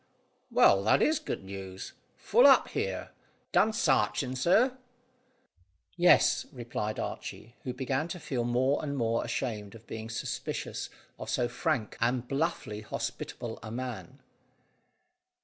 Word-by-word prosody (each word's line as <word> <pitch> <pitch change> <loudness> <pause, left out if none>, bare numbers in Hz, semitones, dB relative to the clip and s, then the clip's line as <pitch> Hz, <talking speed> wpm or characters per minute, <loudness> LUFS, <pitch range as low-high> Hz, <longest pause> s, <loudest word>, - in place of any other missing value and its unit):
Well, 100 0 +5
that 110 - +5
is 310 -1 +3
good - - -5
news. 95 -1 -7 0.2
Full - - +5
up - - +6
here. - - -3 0.4
Done 220 - +4
sarching, 130 - +1
sir?" 215 - +3 1.2
"Yes," 175 0 +5
replied 120 -5 -4
Archy, 115 - -6
who 130 - -1
began 135 +3 -1
to 175 +1 -6
feel 130 -6 -2
more 125 +4 +2
and 140 -2 -3
more 115 -2 +1
ashamed 105 -5 -3
of 115 0 -14
being 110 0 -6
suspicious 115 - -4 0.3
of - - -6
so 120 - +1
frank 120 -2 -1
and 120 +1 +1
bluffly 135 -7 -2
hospitable 110 +1 -5
a 110 - -7
man. 130 +2 -5
120 Hz, 130 wpm, -30 LUFS, 110-140 Hz, 1.2 s, up